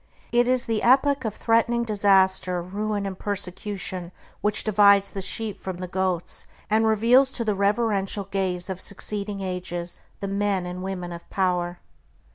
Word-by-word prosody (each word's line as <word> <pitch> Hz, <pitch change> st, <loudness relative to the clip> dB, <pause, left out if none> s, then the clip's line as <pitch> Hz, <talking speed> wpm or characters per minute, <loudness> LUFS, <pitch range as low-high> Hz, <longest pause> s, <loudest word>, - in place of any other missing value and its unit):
It 240 Hz, 0 st, +3 dB
is 255 Hz, -1 st, +2 dB
the 225 Hz, -2 st, 0 dB
epoch 270 Hz, +1 st, +4 dB
of 215 Hz, -1 st, -2 dB
threatening 235 Hz, +1 st, +2 dB
disaster, 190 Hz, -4 st, +3 dB
ruin, 205 Hz, +3 st, -3 dB
and 190 Hz, -1 st, -5 dB
persecution 190 Hz, -2 st, -4 dB, 0.3 s
which 210 Hz, 0 st, +2 dB
divides 200 Hz, -1 st, +5 dB
the 195 Hz, -, -4 dB
sheep 210 Hz, +1 st, -3 dB
from 190 Hz, -2 st, -5 dB
the 180 Hz, 0 st, -5 dB
goats, 185 Hz, -1 st, -2 dB, 0.2 s
and 220 Hz, +1 st, +4 dB
reveals 235 Hz, +5 st, +4 dB
to 235 Hz, -, -2 dB
the 210 Hz, -, +2 dB
reverential 200 Hz, 0 st, +1 dB
gaze 185 Hz, -2 st, -2 dB
of 185 Hz, -1 st, -5 dB
succeeding 200 Hz, 0 st, -3 dB
ages 180 Hz, -2 st, -4 dB, 0.2 s
the 200 Hz, -, -3 dB
men 200 Hz, -2 st, 0 dB
and 180 Hz, +1 st, -5 dB
women 185 Hz, -2 st, -4 dB
of 170 Hz, 0 st, -9 dB
power. 180 Hz, -2 st, 0 dB
200 Hz, 155 wpm, -25 LUFS, 185-215 Hz, 0.3 s, divides